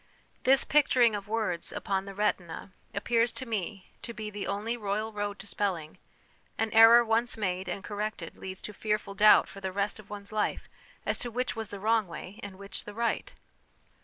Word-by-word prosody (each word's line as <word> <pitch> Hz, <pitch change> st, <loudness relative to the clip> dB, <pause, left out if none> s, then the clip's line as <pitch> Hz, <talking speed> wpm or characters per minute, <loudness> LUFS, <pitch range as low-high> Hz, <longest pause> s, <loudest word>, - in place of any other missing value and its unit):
This 265 Hz, +1 st, +6 dB
picturing 255 Hz, -6 st, +4 dB
of 205 Hz, -1 st, -4 dB
words 210 Hz, -6 st, -1 dB
upon 195 Hz, -1 st, -2 dB
the 195 Hz, -1 st, -8 dB
retina 190 Hz, -3 st, -1 dB, 0.2 s
appears 230 Hz, +3 st, +1 dB
to 260 Hz, -, -4 dB
me 205 Hz, -4 st, -4 dB
to 235 Hz, -, -7 dB
be 215 Hz, 0 st, -5 dB
the 205 Hz, -1 st, -4 dB
only 210 Hz, +4 st, -1 dB
royal 215 Hz, 0 st, -2 dB
road 205 Hz, -1 st, -3 dB
to 195 Hz, -, -10 dB
spelling; 185 Hz, -7 st, -2 dB, 0.6 s
an 225 Hz, -1 st, 0 dB
error 225 Hz, +2 st, +9 dB
once 230 Hz, +1 st, +1 dB
made 185 Hz, -3 st, -2 dB
and 195 Hz, +2 st, -4 dB
corrected 205 Hz, -4 st, -4 dB
leads 190 Hz, 0 st, -8 dB
to 210 Hz, -, -6 dB
fearful 210 Hz, -1 st, -2 dB
doubt 210 Hz, +2 st, +7 dB
for 195 Hz, -, -11 dB
the 190 Hz, -1 st, -3 dB
rest 200 Hz, +2 st, -1 dB
of 205 Hz, -, -14 dB
one's 205 Hz, 0 st, -7 dB
life, 215 Hz, -1 st, -1 dB, 0.4 s
as -, -, -1 dB
to 245 Hz, -, -3 dB
which 250 Hz, +2 st, -2 dB
was 220 Hz, -2 st, -4 dB
the 200 Hz, -, -7 dB
wrong 220 Hz, 0 st, +2 dB
way 180 Hz, +3 st, -8 dB
and 200 Hz, -2 st, -8 dB
which 195 Hz, -1 st, -6 dB
the 210 Hz, -, -9 dB
right. 235 Hz, +1 st, -1 dB
210 Hz, 190 wpm, -29 LUFS, 195-225 Hz, 0.6 s, error